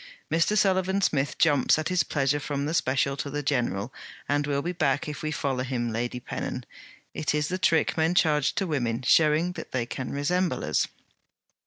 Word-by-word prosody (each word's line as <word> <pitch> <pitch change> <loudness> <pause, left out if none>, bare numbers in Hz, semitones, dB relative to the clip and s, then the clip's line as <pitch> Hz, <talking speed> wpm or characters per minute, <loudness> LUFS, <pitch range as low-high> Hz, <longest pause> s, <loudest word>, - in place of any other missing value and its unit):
'Mr. 165 +6 +2
Sullivan 190 -1 +2
Smith 145 -7 0
jumps 145 -4 +4
at 155 +2 -2
his 180 -2 +2
pleasure 145 0 0
from 140 -1 -3
the 155 - -2
special 140 -2 +1
to 140 - -4
the 145 +1 -3
general, 125 -5 -1 0.3
and 145 0 0
will 140 -1 0
be 175 - -1
back, 140 -5 0
if 150 -2 -5
we 155 - -2
follow 135 -4 -1
him, 120 -3 -2
Lady 120 +2 -2
Pennon. - - -5 0.5
It 150 -1 -1
is 150 0 0
the 185 +1 -2
trick 165 -2 +2
men 165 +2 +1
charge 150 -4 +2
to 200 - 0
women, 125 -7 -1
showing 155 +5 +4
that - - -9
they 125 -2 0
can 125 +2 -5
resemble 175 +6 0
us.' - - +1
145 Hz, 190 wpm, -26 LUFS, 135-165 Hz, 0.5 s, jumps